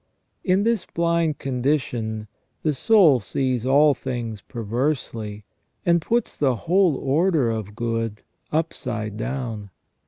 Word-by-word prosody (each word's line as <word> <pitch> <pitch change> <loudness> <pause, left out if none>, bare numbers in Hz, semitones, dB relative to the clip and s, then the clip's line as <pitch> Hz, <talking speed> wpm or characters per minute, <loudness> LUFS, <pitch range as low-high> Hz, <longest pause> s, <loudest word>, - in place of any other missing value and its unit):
In 190 +2 +3
this 225 -4 +1
blind 170 -3 +1
condition, 125 -5 -1 0.4
the 155 - +2
soul 170 - +5
sees 125 +4 -1
all 145 +2 +6
things 120 -5 -4
perversely, 115 -3 -3 0.4
and 170 -1 +4
puts 235 +8 -1
the 135 -4 +3
whole 180 -3 +4
order 145 -1 +2
of 105 -2 -5
good 115 -2 -2 0.3
upside 120 -9 -2
down. 115 -3 -4
130 Hz, 115 wpm, -23 LUFS, 115-160 Hz, 0.4 s, all